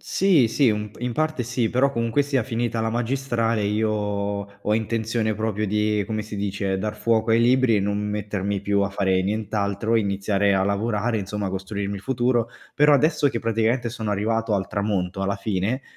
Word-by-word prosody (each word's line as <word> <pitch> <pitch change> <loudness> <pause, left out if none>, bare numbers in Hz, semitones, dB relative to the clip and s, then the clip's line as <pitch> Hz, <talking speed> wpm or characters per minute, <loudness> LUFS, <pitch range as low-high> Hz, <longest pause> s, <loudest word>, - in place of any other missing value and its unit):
Sì, 175 -11 +3
sì, 130 +2 +3
u 105 0 -3
in 125 0 -2
parte 155 0 -1
sì, 120 -1 -1
però 135 +4 +2
comunque 115 +2 +1
sia 140 -3 0
finita 115 -1 -2
la 115 - 0
magistrale, 120 -2 0
io 105 +2 +1
ho 100 0 -2
intenzione 110 0 -1
proprio 110 0 -2
di, 105 +1 +1
come 110 -1 -2
si 105 0 -8
dice, 100 -1 -2
dar 105 +2 -3
fuoco 110 +1 +1
ai 115 - +5
libri 125 -1 +4
e - - +2
non 100 +1 -1
mettermi 105 -1 -2
più 100 0 +1
a 100 - +1
fare 95 -1 +1
nient'altro, 105 +1 -1
iniziare 100 -1 +1
a 95 0 +2
lavorare, 105 +3 0
insomma, 100 0 -3
costruirmi 100 +1 -4
il - - -8
futuro. 120 0 0 0.3
Però 150 +1 +5
adesso 150 0 +3
che 120 - -2
praticamente 115 +2 0
sono 110 -2 -4
arrivato 110 +2 0
al 95 -2 -1
tramonto, 95 -2 -2
alla 100 +1 -1
fine, 100 +5 -2
110 Hz, 180 wpm, -23 LUFS, 100-115 Hz, 0.3 s, ai